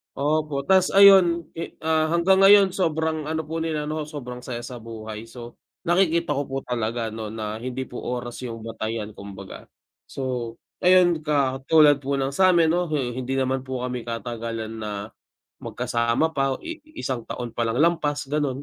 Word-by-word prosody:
Opo, 150 0 0
ta's 190 +4 +4
ayon, 190 -4 +6
i 165 - -6
ah, 160 0 +2
hanggang 170 +4 +3
ngayon 195 0 +7
sobrang 160 -4 -1
ano 160 0 -1
po 160 +2 -4
nila, 160 -2 -2
'no, 155 0 -3
sobrang 125 -5 -7
saya 120 -1 -6
sa 125 0 -7
buhay. 110 -1 -8
So, 120 0 -11 0.2
nakikita 170 -2 +2
ko 145 -1 -1
po 135 - -4
talaga, 115 -1 -2
'no, 110 0 -5
na 110 -1 -4
hindi 130 +2 -4
po 125 -1 -8
oras 120 -1 -4
yung 115 -2 -7
batayan, 110 -1 -4
kumbaga. 100 -1 -10 0.4
So 125 -4 -4 0.2
ayon, 180 -2 +5
katulad 145 +1 +4
po 140 0 -2
ng 135 0 -1
sa 185 +5 +4
'min 165 -2 +4
'no, 175 +1 +1
hi 140 -6 -1
hindi 130 +1 -3
naman 130 0 -1
po 130 -1 -3
kami 125 -2 -4
katagalan 115 -1 -5
na 105 -1 -5 0.5
magkasama 115 +7 0
pa, 135 -1 0
i 330 -1 -6 0.2
isang 130 -3 -3
taon 120 -2 -5
pa 120 - -1
lang 115 +2 -1
lampas, 155 -3 +1
gano'n. 145 -2 -1
135 Hz, 170 wpm, -24 LUFS, 120-160 Hz, 0.5 s, ngayon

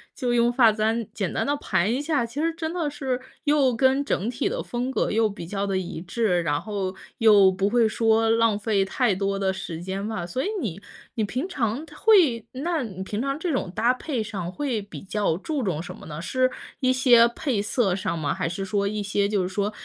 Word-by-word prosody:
就 250 -3 -1
用 240 0 +3
发 240 -2 +5
簪 220 +2 0
简 195 -5 -2
单 - - -1
地 285 - +1
盘 190 -6 0
一 260 - -1
下， 295 -5 0
其 235 +5 -7
实 330 +1 +1
真 320 -1 -3
的 335 -4 -1
是 265 -3 -3 0.3
又 285 -4 +3
跟 265 +3 +3
整 210 -7 -1
体 245 - -1
的 - - -3
风 245 +1 -3
格 - - 0
又 225 +1 +3
比 200 -4 -8
较 200 +2 -2
地 195 -1 0
一 175 -3 -4
致， 185 -1 0
然 145 -3 0
后， 195 -3 -3 0.2
又 205 -4 +7
不 190 +1 0
会 235 0 +4
说 225 0 +2
浪 230 -2 +3
费 210 -2 +1
太 240 +2 +1
多 195 +1 -1
的 195 -1 +1
时 165 -3 -6
间 190 +3 -4
吧。 220 -6 -3
所 215 +10 -3
以 - - -1
你 195 -7 -4 0.4
你 220 - 0
平 255 - -2
常 250 - -1
它 300 -1 -15
会 320 - +4
那 315 +5 -1
你 190 -5 -7
平 205 +2 -4
常 275 +1 -1
这 345 +1 -1
种 250 - -2
搭 235 +2 +3
配 265 -3 -3
上 195 -5 -5
会 255 -1 -2
比 205 - -10
较 200 -3 0
注 290 - -3
重 175 -7 -1
什 175 - -8
么 - - -13
呢？ 150 -1 -6
是 255 +8 +1 0.3
一 255 -1 +3
些 245 -3 +6
配 240 -1 -2
色 205 -2 +1
上 185 -3 -2
吗？ 150 -3 -1
还 - - -1
是 180 +3 -4
说 200 +1 0
一 210 +1 -2
些 200 0 +1
就 205 -2 +1
是 180 - -2
说， 200 +2 -1
220 Hz, 250 characters per minute, -25 LUFS, 195-255 Hz, 0.4 s, 又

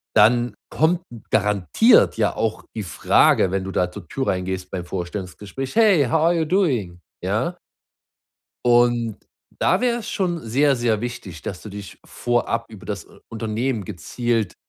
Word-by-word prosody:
Dann 120 +1 +4
kommt 165 +3 +2 0.3
garantiert 105 - +4
ja 110 -2 +1
auch 110 0 -2
die 110 - -3
Frage, 90 0 +3
wenn 95 0 -1
du 95 - -5
da 90 -1 0
zur 90 -2 -10
Tür 135 +8 -3
reingehst, 95 0 -2
beim 90 -2 -3
Vorstellungsgespräch: 95 +7 -5
„Hey, 205 -10 +5
how 155 +6 +1
are 170 +1 +4
you 165 -1 +1
doing,“ 130 - 0 0.2
ja? - - -1 1.1
Und 120 -2 +3 0.4
da - - +2
wäre 240 -1 +1
es 230 - -7
schon 175 -3 -1
sehr, 140 +5 +2
sehr 120 -4 0
wichtig, 105 -9 -6
dass 90 - -5
du - - -8
dich 100 -1 -9
vorab 120 -1 -1
über 110 -4 -12
das, 100 -3 -4
äh, - - -19
Unternehmen 115 0 -2
gezielt 110 - -2
115 Hz, 155 wpm, -22 LUFS, 95-135 Hz, 1.1 s, Hey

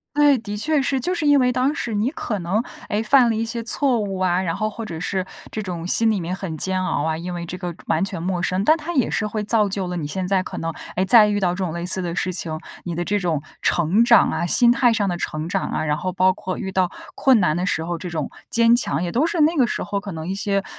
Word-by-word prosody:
对， 290 -2 +5
的 210 -3 -6
确 300 +6 +1
是。 270 0 0
就 355 +9 -1
是 335 -4 -1
因 290 -1 +5
为 250 -1 +3
当 260 +3 +1
时 235 - -3
你 210 +4 +1
可 235 -8 -4
能， 190 +6 -1 0.3
诶， 210 +2 0
犯 250 +1 +5
了 225 - 0
一 225 +1 -1
些 230 +1 -4
错 250 +1 +1
误 200 -2 -3
啊， 185 -1 +1
然 165 -3 -2
后 215 - -1
或 225 +2 -7
者 170 -7 -6
是 185 +2 -2 0.3
这 215 - -3
种 175 -4 -5
心 225 +5 +3
里 215 -3 +1
面 175 +1 -3
很 180 -4 -6
煎 185 +2 0
熬 145 - -1
啊， 160 0 0
因 175 +2 -5
为 170 0 -5
这 170 - -6
个 175 -1 -5
完 160 +3 +1
全 190 -3 -4
陌 180 0 -2
生， 185 +2 0
但 310 - +5
它 330 +2 -5
也 265 -7 +1
是 210 - 0
会 210 0 -3
造 210 -1 +2
就 195 -1 -2
了 180 - -4
你 160 -4 -3
现 180 +5 -3
在 190 0 +2
可 - - -7
能， 165 0 -3 0.2
哎， 185 - +1
再 215 +2 +7
遇 205 -1 0
到 185 -3 +1
这 180 - -5
种 175 - -2
类 170 +1 -4
似 185 +1 +3
的 170 -1 -3
事 185 0 -1
情， 160 -3 -4 0.2
你 175 -2 -4
的 175 +1 -2
这 205 +3 0
种 165 -6 -1 0.2
成 175 +7 +2
长 235 0 +5
啊， - - -1
心 240 +7 +5
态 245 -1 +3
上 215 -3 0
的 175 -2 -1
成 155 -2 -4
长 195 +2 -2
啊， - - -2
然 150 -1 +1
后 185 - -3
包 185 +1 +3
括 185 0 -5
遇 190 - -4
到 185 -1 +1 0.3
困 260 -4 +4
难 155 -5 +2
的 180 +1 -1
时 160 -3 -1
候， 175 0 -3
这 180 - -6
种 160 -4 -4 0.2
坚 230 0 +5
强 170 - 0
也 175 - -2
都 275 - +2
是 340 - -2
那 315 +3 +4
个 260 -6 +3
时 - - -3
候 200 - -2
可 200 0 -7
能 160 -1 -6
一 190 - -2
些， 200 0 -1
195 Hz, 310 characters per minute, -22 LUFS, 175-230 Hz, 0.3 s, 再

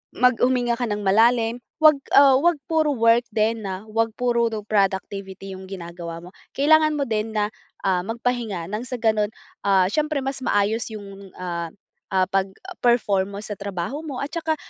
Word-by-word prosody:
Mag 250 -1 +3
huminga 245 -1 +1
ka 245 - 0
ng 210 -1 -3
malalim, 225 +4 +3 0.2
'wag, 305 -2 +7 0.2
ah, 275 -1 +8
'wag 345 +3 +3
puro 310 -2 +1
work 230 +1 +3
din 220 +1 +1
na 190 +2 -5
wag 225 0 +1
puro 235 -1 +1 0.2
productivity 195 -1 -2
yung 190 0 -9
ginagawa 170 -2 -7
mo. 180 - -10 0.3
Kailangan 310 +2 +4
mo 285 - 0
din 220 -3 -2
na, 210 0 0 0.3
ah, 185 -2 +2
magpahinga 225 -6 -2
ng 215 +3 -3
sa 250 - -4
gano'n, 215 -3 +1 0.4
ah, 190 -2 +5
siyempre 300 -2 0
mas 270 0 -3
maayos 220 -2 0
yung, 200 -1 -10
ah, 170 -2 -4 0.4
ah, 190 -1 +2
pag-perform 200 - 0
mo - - -5
sa 210 -1 -7
trabaho 200 - -4
mo, 285 -4 -5
at 290 - -5
saka, 320 -1 -1
225 Hz, 165 wpm, -23 LUFS, 195-250 Hz, 0.4 s, ah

